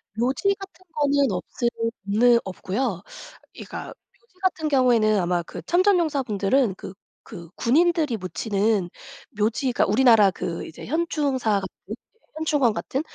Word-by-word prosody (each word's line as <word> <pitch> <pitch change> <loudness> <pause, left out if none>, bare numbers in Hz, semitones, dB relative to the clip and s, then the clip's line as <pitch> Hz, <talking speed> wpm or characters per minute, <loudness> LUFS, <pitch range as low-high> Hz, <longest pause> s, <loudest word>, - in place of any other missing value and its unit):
묘지 265 - +1
같은 385 -1 -12
거는 285 -4 +2
없으 190 +6 -4 0.4
없느 235 +4 +4
없고요. 190 +2 -3 0.5
그러니까 - - -8
묘지 470 - -18
같은 345 -4 0
경우에는 240 -7 +3
아마 175 -1 0
그 - - -9
참전용사분들은 275 - +1
그 - - -9 0.3
그 170 -6 -10
군인들이 310 -1 +2
묻히는 200 0 -1 0.5
묘지가 235 +4 +1
우리나라 220 -1 +5
그 170 -2 -5
이제 160 - -10
현충사 275 - 0
같은? 190 - -4 0.2
예 - - -3 0.4
현충원 295 -7 +1
같은? 265 +5 -3
245 Hz, 295 characters per minute, -24 LUFS, 205-295 Hz, 0.5 s, 우리나라